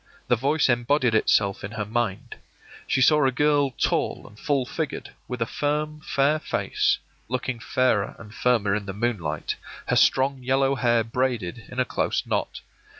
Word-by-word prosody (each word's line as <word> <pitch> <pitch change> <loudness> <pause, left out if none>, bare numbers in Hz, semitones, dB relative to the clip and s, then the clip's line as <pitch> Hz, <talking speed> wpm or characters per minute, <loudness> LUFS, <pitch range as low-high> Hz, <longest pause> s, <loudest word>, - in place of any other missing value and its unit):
The 120 - +5
voice 140 +6 +2
embodied 120 0 +2
itself 100 -2 +2
in 100 +3 -6
her 105 -1 -3
mind. 110 -2 -2 0.5
She 130 - +1
saw 150 +3 +5
a 135 - +3
girl 145 +1 +2
tall 125 - -1
and 105 +1 -16
full 140 -3 0
figured, 155 +4 -4 0.2
with 125 -2 -2
a - - -4
firm, 150 +4 -2
fair 145 +3 +2
face, - - 0 0.3
looking 125 0 -3
fairer 115 -4 +1
and 110 -1 -12
firmer 115 -6 +2
in 100 -1 -2
the 100 - -4
moonlight, 105 -4 -2 0.3
her - - +3
strong 135 0 +3
yellow 135 +2 +2
hair 120 -3 +2
braided 115 -3 -2
in 125 - -6
a 130 - +3
close - - -1
knot. - - -2
125 Hz, 165 wpm, -25 LUFS, 110-135 Hz, 0.5 s, The